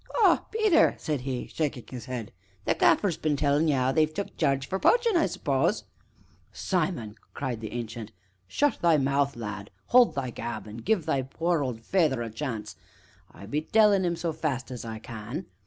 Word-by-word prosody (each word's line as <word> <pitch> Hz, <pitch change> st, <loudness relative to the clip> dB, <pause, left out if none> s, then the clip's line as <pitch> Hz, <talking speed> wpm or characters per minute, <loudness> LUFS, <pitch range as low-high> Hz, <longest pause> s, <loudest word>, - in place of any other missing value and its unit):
"Ah, -, -, +4 dB
Peter!" 430 Hz, -7 st, +4 dB
said 150 Hz, -5 st, -2 dB
he, 130 Hz, -1 st, -3 dB
shaking 145 Hz, -6 st, -3 dB
his 125 Hz, -3 st, -7 dB
head, 120 Hz, -4 st, -5 dB, 0.3 s
"the -, -, +3 dB
Gaffer's 185 Hz, -6 st, +3 dB
been 155 Hz, -2 st, 0 dB
tellin' 145 Hz, +2 st, +2 dB
ye 150 Hz, -, +3 dB
'ow 130 Hz, 0 st, +2 dB
they've 155 Hz, +2 st, +2 dB
took 200 Hz, +5 st, -5 dB
Jarge 135 Hz, -3 st, +1 dB
for 190 Hz, -, -2 dB
poachin', 470 Hz, -, +3 dB
I 335 Hz, -, +4 dB
suppose -, -, 0 dB, 0.4 s
" -, -, -33 dB, 0.2 s
"Simon!" 155 Hz, -, -2 dB, 0.2 s
cried 125 Hz, -5 st, -3 dB
the 110 Hz, -, -6 dB
Ancient, 115 Hz, -2 st, -5 dB, 0.4 s
"shut 290 Hz, -, +1 dB
thy 170 Hz, -3 st, +5 dB
mouth, 140 Hz, 0 st, +1 dB
lad 105 Hz, -3 st, -6 dB, 0.2 s
hold 245 Hz, -1 st, +6 dB
thy 130 Hz, -3 st, -2 dB
gab 115 Hz, -2 st, -5 dB
an' 105 Hz, +1 st, -8 dB
give 185 Hz, -, 0 dB
thy 140 Hz, -4 st, +1 dB
poor 165 Hz, +5 st, -1 dB
old 125 Hz, -5 st, -3 dB
feyther 145 Hz, -4 st, +1 dB
a 115 Hz, -, -6 dB
chance 115 Hz, -3 st, -5 dB, 0.6 s
I 100 Hz, -, -12 dB
be 145 Hz, +9 st, -1 dB
tellin' 205 Hz, +2 st, +4 dB
'im 170 Hz, -1 st, 0 dB
so 170 Hz, -1 st, -2 dB
fast 145 Hz, -6 st, -3 dB
as 125 Hz, -, -6 dB
I 110 Hz, -1 st, -5 dB
can! 115 Hz, -, -7 dB
140 Hz, 190 wpm, -27 LUFS, 120-170 Hz, 0.6 s, hold